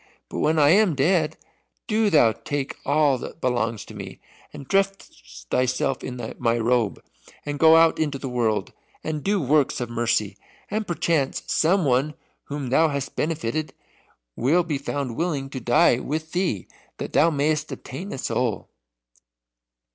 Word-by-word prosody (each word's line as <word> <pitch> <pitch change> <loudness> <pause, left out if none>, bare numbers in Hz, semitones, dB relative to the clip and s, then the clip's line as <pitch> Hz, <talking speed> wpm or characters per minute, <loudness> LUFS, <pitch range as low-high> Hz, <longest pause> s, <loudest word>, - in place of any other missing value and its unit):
But - - -5
when 160 +1 +2
I 145 -1 +5
am 195 -3 +4
dead, 155 +2 +1 0.5
do 220 -1 +2
thou 145 - +5
take 145 +3 -4
all 140 -2 +3
that - - -8
belongs 115 -5 -1
to - - -12
me, - - -8 0.3
and 140 -3 -10
dress - - -2
thyself 130 +1 0
in 125 -1 -5
my 115 -1 +1
robe, 115 -2 0 0.4
and 145 -1 -4
go 160 0 +7
out 165 0 +5
into 150 -3 0
the 135 - -6
world, 115 -4 -1 0.3
and 155 -2 -3
do 200 0 +1
works 145 -1 +2
of 120 -1 -4
mercy, 110 -4 0 0.3
and 215 0 -2
perchance 165 -5 0
some 180 +2 +2
one 135 +3 +1 0.3
whom 140 -3 -5
thou 160 +4 +5
hast 140 -2 -4
benefited 155 -1 -2 0.6
will 160 +9 +2
be 155 -5 -2
found 140 -4 -4
willing 145 -5 -2
to 130 - -4
die 120 0 +4
with 155 +4 -4
thee, 175 - -1 0.3
that - - -6
thou 165 - +5
mayst 150 0 0
obtain 175 +10 -7
a - - -5
soul." 125 -4 -2
145 Hz, 155 wpm, -24 LUFS, 125-160 Hz, 0.6 s, go